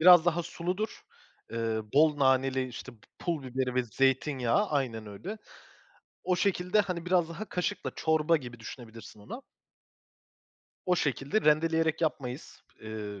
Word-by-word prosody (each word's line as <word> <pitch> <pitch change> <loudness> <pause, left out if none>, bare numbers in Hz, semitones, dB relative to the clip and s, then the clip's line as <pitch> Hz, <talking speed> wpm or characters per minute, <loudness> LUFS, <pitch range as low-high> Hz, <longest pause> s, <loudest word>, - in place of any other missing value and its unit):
biraz 175 0 +9
daha 175 0 +2
suludur. 180 +6 -3 0.5
Eee, 115 -1 -1
bol 150 0 +5
naneli, 130 -1 +3
işte, 125 +1 -8
pu 115 - -21 0.2
pul 165 -5 -2
biberi 130 0 -2
ve 130 - +3
zeytinyağı... 135 - +1
Aynen 120 -7 -1
öyle. 175 - -7 0.9
O 180 - +2
şekilde, 180 +1 +2
hani, 180 -4 -3
biraz 180 -2 +3
daha 180 +6 -5
kaşıkla 180 - -2
çorba 160 +1 +3
gibi 120 -6 -8
düşünebilirsin 115 -2 -10
onu. 240 - -8 1.4
O 180 -1 +2
şekilde 140 - 0
rendeleyerek 160 0 +3
yapmayız, 140 -4 -3 0.2
eee, 105 -2 -6
150 Hz, 130 wpm, -30 LUFS, 125-175 Hz, 1.4 s, biraz